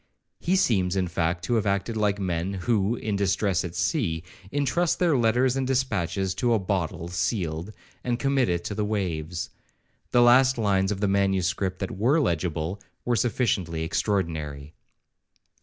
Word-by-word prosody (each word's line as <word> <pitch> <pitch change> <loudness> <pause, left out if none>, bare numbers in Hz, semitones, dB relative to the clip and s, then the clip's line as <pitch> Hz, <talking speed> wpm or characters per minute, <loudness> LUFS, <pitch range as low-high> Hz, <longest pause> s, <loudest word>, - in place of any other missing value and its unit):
He 180 +3 +1
seems, 95 - +2
in 95 -2 +1
fact, 85 +1 -1
to - - -1
have 105 -2 0
acted 100 +3 0
like 105 -2 +1
men, 95 0 -2
who, 100 +3 +1
in 110 -3 -3
distress 100 -2 +1
at 90 -2 -6
sea, 85 - 0 0.3
intrust 145 +5 +1
their 170 -4 +3
letters 125 +2 +2
and 135 -1 -1
dispatches 100 -8 0
to 120 -2 +3
a - - +3
bottle 90 -4 -2
sealed, 85 0 -2 0.3
and 120 -1 0
commit 135 -1 +1
it 85 -1 -1
to - - -4
the 105 +1 -1
waves. 90 -5 -3 0.6
The 120 - +4
last 130 +2 +6
lines 100 -3 +1
of 100 -1 -3
the 105 - +2
manuscript 95 -1 +1
that 95 - -2
were 130 +9 +3
legible, 85 - -1 0.2
were 120 - +2
sufficiently 100 -8 0
extraordinary. 80 -6 -2
100 Hz, 155 wpm, -26 LUFS, 85-120 Hz, 0.6 s, last